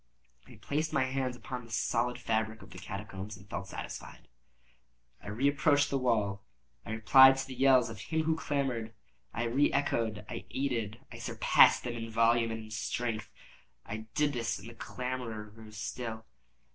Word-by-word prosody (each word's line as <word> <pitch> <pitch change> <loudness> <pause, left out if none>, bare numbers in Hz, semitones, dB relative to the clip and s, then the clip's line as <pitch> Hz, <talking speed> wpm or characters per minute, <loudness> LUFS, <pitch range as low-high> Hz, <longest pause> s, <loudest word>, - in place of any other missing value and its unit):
I - - -13
placed 155 +2 -2
my 140 -4 +2
hand 130 -1 -1
upon 125 0 -6
the 115 - -14
solid 120 +2 0
fabric 110 -2 -1
of - - -15
the 90 - -9
catacombs, 100 +1 -6
and 100 +1 -16
felt 95 0 -5
satisfied. - - -8 0.9
I - - -12
reapproached 145 +6 +2
the 135 - +1
wall. 105 -6 +1 0.4
I - - -10
replied 130 +4 +8
to 135 - -2
the 135 - -8
yells 130 -2 +5
of 110 - -9
him 160 +7 -1
who 160 0 +2
clamored. 130 -8 -2 0.4
I 115 - -2
re 130 +5 +2
echoed—I 110 -7 -1
aided—I 115 -4 -3
surpassed - - +5
them 120 - -3
in 115 -1 -5
volume 115 +1 +3
and 110 0 -4
in 110 - -12
strength. 110 +1 -2 0.6
I 110 +1 -6
did 150 -1 +2
this, 120 -2 -1
and 100 - -10
the 120 - -9
clamorer 115 -3 -5
grew 110 0 -12
still. 110 +1 -5
115 Hz, 165 wpm, -31 LUFS, 110-130 Hz, 0.9 s, replied